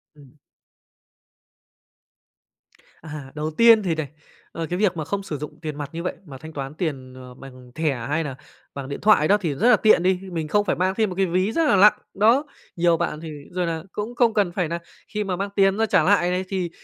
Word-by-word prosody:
Ừm. 140 -4 -18 2.7
À, 150 -4 -8
đầu 155 +1 -3
tiên 230 -2 +7
thì 170 -4 0
này, 155 -2 -3 0.4
ờ, 165 - -4
cái 180 - -2
việc 200 -4 +1
mà 155 - -3
không 200 +5 -3
sử 155 -6 -5
dụng 150 +1 -8
tiền 155 -3 -5
mặt 145 -2 -5
như 170 +1 -5
vậy 180 - -2
mà 140 -5 -10
thanh 160 +3 -11
toán 135 0 -5
tiền, 135 -6 -4
à, 125 -1 -11
bằng 130 -2 -13
thẻ 155 -4 0
hay 155 +3 0
nà 140 -4 -5 0.4
bằng 140 -1 -7
điện 140 - -6
thoại 205 -8 +5
đó 205 - +5
thì 160 -5 -1
rất 225 - +3
là 245 - +8
tiện 215 -5 +4
đi, 185 0 +2
mình 160 -2 -3
không 205 +6 +1
phải - - 0
mang 185 +1 0
thêm 220 -3 +1
một 180 - -6
cái 195 +1 +2
ví 185 +4 0
rất 330 +7 +1
là - - +4
lặng, 205 +2 +6 0.2
đó. 230 +8 +4 0.3
Nhiều 170 -1 +3
bạn 160 -2 -2
thì, 165 - -7 0.2
rồi 180 0 -1
nà, 165 -1 -3
cũng 215 +4 -5
không 240 -2 +3
cần 205 -5 +1
phải 175 -2 -1
nà 170 +1 -3 0.3
khi 210 - -1
mà 190 -3 -2
mang 200 +2 -3
tiền 195 0 +3
ra 225 - +2
trả - - +3
lại 180 -2 +3
này 185 +1 -1
thì, 185 -3 -2
175 Hz, 235 wpm, -23 LUFS, 150-200 Hz, 2.7 s, là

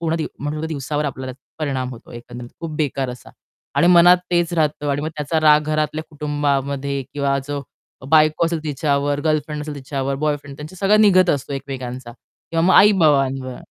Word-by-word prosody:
पूर्ण 165 -1 -1
दिव 160 - -2
मग 145 - -3
पूर्ण 155 +1 -3
दिवसावर 150 -1 -3
आपल्याला 130 -2 -4 0.3
परिणाम 135 -4 -2
होतो 120 -3 -12
एकंदरीत 120 0 -9
खूप 165 - -5
बेकार 140 -3 -1
असा 125 -1 -11 0.4
आणि 175 - +3
मनात 175 0 +7
तेच 175 -1 +1
राहतं 150 -2 0
आणि 140 +1 -1
मग 155 - -2
त्याचा 150 +2 -1
राग 150 -1 +6
घरातल्या 155 +1 -1
कुटुंबामध्ये 140 -2 -2
किंवा 140 -1 0
जो 145 -1 -3 0.5
बायको 155 +1 +4
असेल 165 0 -1
तिच्यावर, 145 -1 0
गर्लफ्रेंड 155 -1 -1
असेल 150 0 -6
तिच्यावर, 135 0 -3
बॉयफ्रेंड, 145 -1 -3
त्यांचं 155 +5 -10
सगळं 205 +3 +3
निघत 185 -4 +5
असतो 140 0 -2
एकमेकांचा 130 -3 -6
किंवा 165 +6 -6
मग 185 - +4
आई-बाबांवर. 135 -10 +4
145 Hz, 170 wpm, -20 LUFS, 135-155 Hz, 0.5 s, मनात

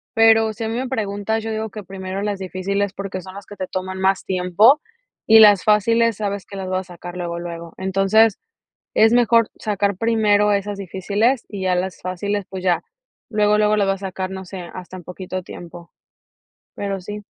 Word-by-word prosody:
pero 225 -1 +5
si 225 +2 -6
a 220 - -2
mí 225 - -3
me 255 0 -3
preguntas, 215 -2 -2
yo 225 - -3
digo 220 0 -3
que 210 0 -8
primero 190 +1 -5
las 205 -2 -2
difíciles 190 +2 -2
porque 195 -2 -5
son 185 +1 -11
las 200 -1 -9
que 205 - -11
te 185 - -4
toman 185 0 -4
más 190 0 +1
tiempo, 190 - +4 0.5
y 225 - +8
las 205 -3 +7
fáciles 230 +2 +3
sabes 200 -2 -3
que 200 - -10
las 190 -1 -5
vas 185 -1 -2
a - - -10
sacar 175 +1 -9
luego, 170 -1 -4
luego. 170 -1 -7
Entonces, 195 +3 +3 0.5
es 220 +1 +5
mejor 235 -2 +4
sacar 200 -2 -1
primero 210 -1 +3
esas 200 0 -1
difíciles 200 +6 0
y 200 -2 -6
ya 185 -1 +1
las 185 +1 -3
fáciles, 200 +3 -2
pues 185 -1 -6
ya 175 -3 +2 0.5
luego, 210 -1 +2
luego 210 0 +3
las 205 -2 +2
va - - +3
a 195 - -4
sacar, 190 -1 -4
no 190 0 -6
sé, 180 -2 -8
hasta 185 0 -8
en 180 - -11
poquito 185 +1 -6
tiempo, 170 -1 -11 0.8
pero 200 -1 -3
sí. 210 +3 -7
200 Hz, 200 wpm, -21 LUFS, 185-215 Hz, 0.8 s, y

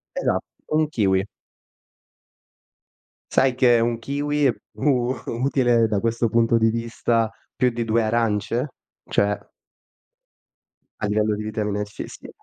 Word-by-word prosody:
Esatto, - - 0 0.2
1 155 0 +2
kiwi. 95 -8 +2 2.1
Sai 130 -1 +3
che 120 -2 +5
1 115 0 +1
kiwi 145 +5 -1
è 125 - +2 0.3
u 130 -3 +2
utile 120 -2 +2
da 105 -2 0
questo 115 +1 +1
punto 115 +1 +3
di 115 0 +3
vista 115 0 0 0.2
più 125 - +3
di 115 0 -3
2 115 +1 +2
arance? 115 +3 0 0.4
Cioè 105 0 0 1.5
a - - -1
livello 105 +1 +1
di 105 - -5
vitamina 105 -1 -2
C, 105 0 -7
sì. - - -11
115 Hz, 125 wpm, -23 LUFS, 110-125 Hz, 2.1 s, che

